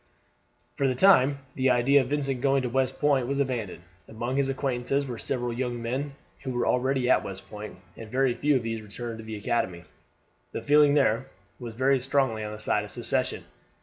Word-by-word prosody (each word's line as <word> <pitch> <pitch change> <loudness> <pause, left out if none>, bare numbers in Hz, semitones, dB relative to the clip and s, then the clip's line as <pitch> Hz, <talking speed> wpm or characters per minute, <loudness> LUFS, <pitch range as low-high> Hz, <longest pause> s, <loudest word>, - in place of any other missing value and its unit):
For 140 -2 +2
the 130 - 0
time 145 -4 +5 0.2
the 130 0 +1
idea 125 +3 +4
of 130 - -4
Vincent 140 -3 -1
going 135 -1 +2
to 125 - -1
West 130 +1 0
Point 140 -4 +2
was 140 +1 -1
abandoned. 115 -10 -2 0.2
Among 120 +3 -4
his 140 -1 +1
acquaintances 135 +1 -1
were 120 -4 -6
several 125 -3 -2
young 120 0 -3
men 135 +5 -3 0.3
who 135 - -5
were 120 0 0
already 130 0 +1
at 130 - +4
West 95 0 -6
Point, 105 -2 -8 0.2
and 110 -1 -10
very 130 +1 +2
few 145 +3 +1
of 125 - 0
these 115 -1 -3
returned 110 +2 -7
to - - -8
the 110 0 -6
academy. 95 -5 -2 0.7
The - - -4
feeling 145 0 +5
there 135 -3 +2 0.3
was 120 -3 -7
very 135 +2 +3
strongly 130 -4 0
on 105 - -5
the 105 - -7
side 105 -1 0
of 105 - -9
secession. - - -1
125 Hz, 200 wpm, -27 LUFS, 115-135 Hz, 0.7 s, time